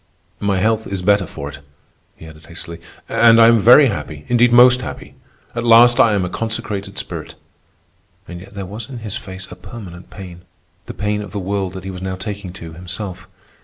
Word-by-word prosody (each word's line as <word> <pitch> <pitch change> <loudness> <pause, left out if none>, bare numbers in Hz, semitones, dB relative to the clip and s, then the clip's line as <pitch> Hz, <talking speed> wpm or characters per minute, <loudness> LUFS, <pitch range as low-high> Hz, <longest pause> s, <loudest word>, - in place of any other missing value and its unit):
"My 100 -2 0
health 110 +3 0
is 95 -2 -4
better 100 -1 +3
for 70 -1 -7
it," 70 - -10 0.6
he - - -14
added 80 0 -14
hastily. 85 0 -9 0.3
"And 115 -1 +5
I 115 - +8
am 115 -1 +5
very 125 +8 +7
happy—indeed, 105 - 0
most 125 +1 +6
happy. - - -8 0.4
At 120 - -3
last 120 +1 +6
I 115 -4 +5
am 100 -3 0
a - - -4
consecrated 105 -3 -4
spirit." - - -7 0.9
And 85 -1 -8
yet 100 +2 -14
there 100 -1 -5
was 110 +5 -8
in 130 - -7
his 105 - -5
face 95 0 -8
a - - -8
permanent 90 -7 -11
pain, 90 -3 -10 0.5
the - - -7
pain 105 +1 -2
of 100 -3 -9
the 105 - -3
world 95 -1 -3
that 95 -1 -8
he 95 - -6
was 90 -1 -8
now 95 0 -3
taking 100 0 -6
to 85 -3 -10
himself. 90 +2 -7
100 Hz, 200 wpm, -19 LUFS, 90-115 Hz, 0.9 s, I